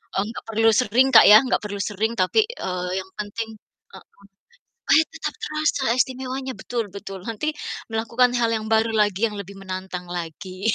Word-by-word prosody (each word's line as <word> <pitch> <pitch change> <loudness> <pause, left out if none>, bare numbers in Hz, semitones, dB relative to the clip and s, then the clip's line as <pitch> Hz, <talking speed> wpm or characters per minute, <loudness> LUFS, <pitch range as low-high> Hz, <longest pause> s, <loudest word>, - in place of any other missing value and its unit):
eee, 195 - +2
gak - - -8
perlu 225 +1 +3
sering, 250 +3 +3
Kak, - - +10
ya, 215 - +11
gak - - +1
perlu 200 -1 -5
sering 215 +4 -1
tapi, 310 - +3
eee, 180 - -4
yang 190 - -8
penting 220 +2 -4 0.5
heeh, - - -12 0.8
supaya 320 -8 +4
tetap - - -4
terasa 305 -3 -1
istimewanya, 260 +1 -2
betul 235 -2 -2
betul, 195 -1 -7
nanti 300 +8 -2 0.4
melakukan 230 +3 +2
hal 230 -1 +2
yang 215 0 -5
baru 220 +1 +3
lagi 205 -2 +2
yang 210 -2 -6
lebih 200 +1 -10
menantang 185 -1 -6
lagi 185 +4 -5
220 Hz, 170 wpm, -23 LUFS, 195-250 Hz, 0.8 s, ya